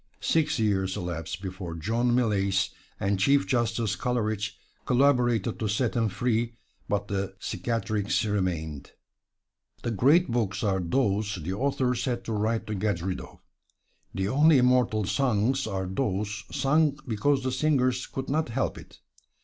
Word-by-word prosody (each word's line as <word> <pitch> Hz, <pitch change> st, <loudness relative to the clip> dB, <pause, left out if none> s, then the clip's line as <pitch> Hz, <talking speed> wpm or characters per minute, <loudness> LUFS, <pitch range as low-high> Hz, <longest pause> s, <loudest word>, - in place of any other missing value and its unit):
Six 155 Hz, -3 st, +1 dB
years 95 Hz, -3 st, 0 dB
elapsed 90 Hz, +1 st, -4 dB
before 95 Hz, -3 st, -5 dB
John 115 Hz, +8 st, +1 dB
Millais 100 Hz, -4 st, +1 dB, 0.3 s
and 100 Hz, 0 st, 0 dB
Chief 140 Hz, +7 st, +4 dB
Justice 115 Hz, -4 st, 0 dB
Coleridge 110 Hz, -2 st, -2 dB, 0.3 s
collaborated 125 Hz, -4 st, +2 dB
to 110 Hz, -, -1 dB
set 105 Hz, +3 st, 0 dB
him 115 Hz, -2 st, +2 dB
free, 115 Hz, +2 st, -1 dB, 0.3 s
but 105 Hz, 0 st, 0 dB
the 95 Hz, -1 st, -3 dB
cicatrix 110 Hz, -2 st, -1 dB
remained. 85 Hz, -8 st, -2 dB, 0.9 s
The 120 Hz, -, -1 dB
great 145 Hz, -, +4 dB
books 110 Hz, -4 st, -1 dB
are 95 Hz, -3 st, +1 dB
those 100 Hz, +2 st, 0 dB
the 90 Hz, +1 st, -4 dB
authors 125 Hz, +1 st, 0 dB
had 125 Hz, -3 st, -2 dB
to 115 Hz, -, -4 dB
write 110 Hz, +1 st, 0 dB
to 110 Hz, -, -4 dB
get 100 Hz, -4 st, -1 dB
rid 95 Hz, 0 st, -2 dB
of; -, -, -13 dB, 0.7 s
the 95 Hz, 0 st, -2 dB
only 145 Hz, +6 st, +5 dB
immortal 125 Hz, -4 st, +3 dB
songs 120 Hz, +3 st, +1 dB
are 95 Hz, -2 st, -2 dB
those 105 Hz, 0 st, -2 dB
sung 145 Hz, +1 st, +2 dB
because 130 Hz, +5 st, +1 dB
the 130 Hz, -, -1 dB
singers 130 Hz, -4 st, +1 dB
could 135 Hz, 0 st, -5 dB
not 155 Hz, -1 st, 0 dB
help 130 Hz, +3 st, -1 dB
it. -, -, -16 dB
110 Hz, 145 wpm, -27 LUFS, 100-125 Hz, 0.9 s, only